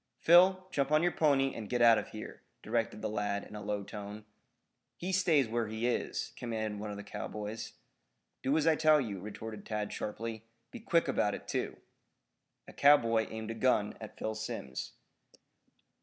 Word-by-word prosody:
"Phil, 185 +2 +6
jump 140 +1 0
on 155 +2 +4
your 175 - +3
pony 135 -5 +2
and 110 -2 -7
get 125 - 0
out 115 -1 +7
of - - -6
here," - - -9 0.2
directed 115 -1 -1
the - - +1
lad 105 -1 -2
in - - -11
a 105 - -6
low 105 0 -2
tone. 105 +1 -8 0.7
"He 180 +2 -3
stays 170 -8 +3
where 115 0 -1
he 110 +2 -3
is," 125 - -1
commanded 110 -3 -3
one 105 0 -5
of 100 - -5
the 105 - -7
cowboys. 105 +2 -6 0.7
"Do 140 +4 +2
as 155 - +1
I 160 -1 +5
tell 155 -1 +5
you," 105 -8 -3
retorted 105 +2 -7
Tad 105 -1 -3
sharply. 110 +1 -5 0.3
"Be - - -8
quick 170 -8 +2
about 105 -6 +1
it, - - -11
too." - - -2 0.9
A - - -11
cowboy 115 -6 +5
aimed 110 0 -5
a - - -2
gun 115 -3 +1
at 110 - -9
Phil 110 - -2
Simms. 105 -12 -5
115 Hz, 180 wpm, -32 LUFS, 105-140 Hz, 0.9 s, out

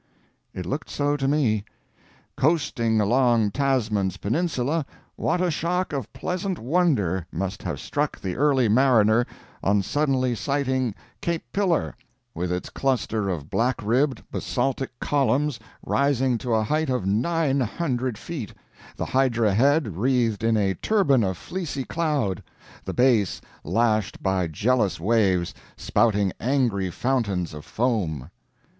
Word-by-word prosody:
It 90 - -6
looked 140 - -4
so 145 0 0
to 135 -2 -1
me. 125 -8 +2 0.7
"Coasting 130 -7 +1
along 115 0 +3
Tasman's 110 -8 0
Peninsula, 150 - 0 0.3
what 180 - 0
a 180 -2 +2
shock 175 +2 -1
of 135 -6 -4
pleasant 185 0 -3
wonder 120 - +1
must 95 +3 -3
have - - -4
struck - - -2
the 90 -2 -4
early 135 -3 +3
mariner 115 -1 +4 0.3
on 100 0 +2
suddenly 130 0 +1
sighting 130 -3 -1 0.3
Cape 170 -1 -1
Pillar, 190 -5 +1 0.4
with 90 +1 -3
its 90 0 -3
cluster 115 -6 0
of 80 -5 -4
black 125 +2 +1
ribbed 125 +4 +1
basaltic 135 0 -1
columns 140 -1 +1 0.3
rising 135 -3 +1
to 120 -1 0
a 110 - +2
height 155 +5 0
of 125 -7 0
900 130 - 0
feet, 135 - -6 0.4
the - - -3
hydra 120 -6 +2
head 130 - +2
wreathed 115 -2 +1
in 115 -1 +3
a 100 -2 +2
turban 140 - +2
of 95 -2 -1
fleecy 165 - -4
cloud, 145 - -1 0.4
the - - -4
base 120 -7 +3 0.2
lashed 110 -3 0
by 95 -2 +1
jealous 105 +5 +1
waves 95 -3 +2 0.2
spouting 105 -5 +2
angry 120 -8 +1
fountains 100 - -1
of 75 0 -8
foam." 90 - -1
125 Hz, 130 wpm, -24 LUFS, 105-140 Hz, 0.7 s, mariner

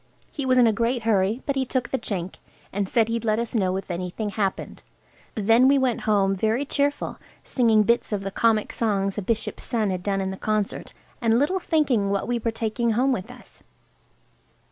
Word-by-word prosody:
He 280 -3 -4
was 255 0 +3
in 245 - +6
a 225 - +3
great 235 +2 0
hurry, 215 +2 +1
but 280 - -1
he 270 - +1
took 255 -1 -2
the 265 - -1
chink 185 -3 -4 0.4
and 200 0 -2
said 225 -2 +2
he'd 230 0 -2
let 215 -1 +1
us 235 0 -3
know 190 -5 +1
if 195 - -6
anything 180 +4 -3
happened. 200 -2 -3 0.5
Then 225 +4 +4
we 280 +1 +5
went 260 -3 0
home 195 -2 +3
very 220 +8 0
cheerful, 285 +1 -1 0.2
singing 225 -4 +3
bits 235 +3 +1
of 205 -2 -1
the 195 - -4
comic 220 0 +1
songs 200 -3 -1
a - - -3
bishop's 215 +3 -2
son 220 -4 0
had 185 -1 -3
done 195 +1 -1
in 190 0 -2
the 190 - -6
concert, 215 -1 -2 0.3
and 230 -1 +3
little 300 +9 +1
thinking 280 - +1
what 200 +1 -1
we 240 0 0
were 230 - -1
taking 225 +1 -1
home 260 +5 +2
with 210 -3 -3
us. 250 0 -15
225 Hz, 205 wpm, -24 LUFS, 200-245 Hz, 0.5 s, in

